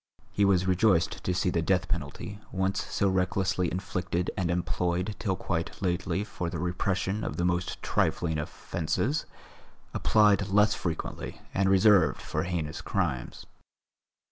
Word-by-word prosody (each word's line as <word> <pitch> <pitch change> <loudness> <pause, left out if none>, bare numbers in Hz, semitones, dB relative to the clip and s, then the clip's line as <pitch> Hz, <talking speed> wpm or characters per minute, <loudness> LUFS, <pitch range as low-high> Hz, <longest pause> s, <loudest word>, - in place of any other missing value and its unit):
He 100 - +2
was 95 -2 +3
rejoiced 95 -2 +2
to - - 0
see 90 0 +1
the 85 - +1
death 95 +1 +1
penalty, 85 +5 -4
once 95 0 0
so 100 - +1
recklessly 95 -1 +1
inflicted 90 -1 -2
and 90 -3 -1
employed 90 +2 -1
till 95 -4 0
quite 85 -2 -3
lately 90 +2 -1
for 90 -4 -4
the 85 - -4
repression 95 +4 -1
of - - -3
the 85 - +1
most 90 +1 -1
trifling 80 -3 0
offences, 85 - -2 0.7
applied 105 -2 +4
less 105 +1 +4
frequently 85 -5 -4
and 95 0 +2
reserved 95 -2 +5
for - - -3
heinous 85 -4 -3
crimes. - - -2
90 Hz, 140 wpm, -28 LUFS, 85-100 Hz, 0.7 s, reserved